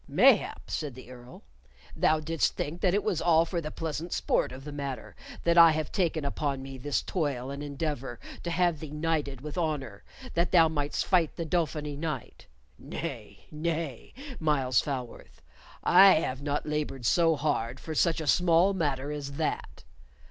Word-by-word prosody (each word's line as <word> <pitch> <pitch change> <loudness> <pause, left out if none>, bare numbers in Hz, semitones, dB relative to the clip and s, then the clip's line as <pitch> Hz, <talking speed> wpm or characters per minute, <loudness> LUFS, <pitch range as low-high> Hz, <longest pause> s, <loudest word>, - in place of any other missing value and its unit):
"Mayhap," - - +3
said 145 -5 -3
the 130 -1 -12
Earl, 125 0 -13 0.5
"thou 155 0 +3
didst 160 +1 0
think 165 +4 -4
that 185 -1 +3
it 205 - +1
was 185 -7 0
all 165 -1 +4
for 170 0 -3
the 155 - -5
pleasant 160 +2 -4
sport - - +1
of 130 +1 -9
the 150 - -7
matter 140 -2 -6 0.3
that 170 0 +4
I 165 -1 +9
have 155 -1 -3
taken 165 -5 0
upon 140 -1 -2
me 135 -1 -8
this 145 +2 -1
toil 140 -7 -2
and 140 +1 -6
endeavor 140 -4 -4 0.2
to 175 - -4
have 170 -2 +1
thee 155 - -7
knighted 150 -3 -2
with 150 +4 -5
honor 135 -11 -3 0.3
that 170 +1 +1
thou 165 -2 +6
mightst 145 -2 -2
fight 175 -5 +2
the 165 - -3
Dauphiny 155 -3 -1
knight. 155 - -5 0.3
Nay, - - -7
nay, 155 -4 -4 0.2
Myles 140 -5 +2
Falworth, 130 -4 -6 0.4
I 190 +2 +8
have 135 -4 -1
not 145 0 -2
labored 150 -4 -3
so 165 +6 +4
hard 140 -6 -1
for 160 - -6
such 165 +1 +2
a 160 - -4
small 175 +4 +4
matter 145 -6 -1
as 145 -1 -5
that. 155 +2 -3
150 Hz, 170 wpm, -28 LUFS, 140-165 Hz, 0.5 s, I